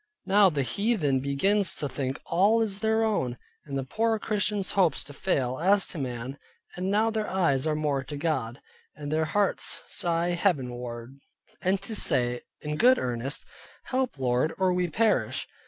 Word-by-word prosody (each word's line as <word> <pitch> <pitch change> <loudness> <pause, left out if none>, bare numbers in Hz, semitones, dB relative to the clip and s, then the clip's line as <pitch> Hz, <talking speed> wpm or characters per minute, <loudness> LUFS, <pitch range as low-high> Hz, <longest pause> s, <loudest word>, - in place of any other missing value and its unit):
Now 200 0 +5
the 145 -5 -1
heathen 170 - 0
begins 185 +9 +2
to 145 - -1
think 135 -1 -3
all 200 +7 +3
is 205 -3 -1
their 220 +1 +2
own, 130 - 0 0.3
and 140 -2 -4
the 135 - -2
poor 225 - 0
Christians' 205 -2 -1
hopes 185 -5 +2
to 145 - -12
fail 135 -6 -1
(as 195 +4 +4
to 165 - -5
man) 125 +1 -5 0.4
and 185 +2 -2
now 215 +3 +2
their 220 -1 -2
eyes 160 -7 +1
are 155 - +1
more 145 -3 -1
to 145 +3 -6
God, 140 -6 -2 0.4
and 145 -1 -6
their 160 +1 +1
hearts 200 +5 0
sigh 170 0 0
heaven 170 -8 0
ward; 120 +2 -8 0.4
and 190 +2 +1
to 220 - -5
say 120 -9 +2 0.2
in 150 0 -3
good 255 +6 +6
earnest, 125 +3 -3 0.4
"Help 255 - -2
Lord, 130 +3 0
or 185 -1 +2
we 180 0 +1
perish." 220 +6 +1
165 Hz, 170 wpm, -27 LUFS, 135-200 Hz, 0.4 s, good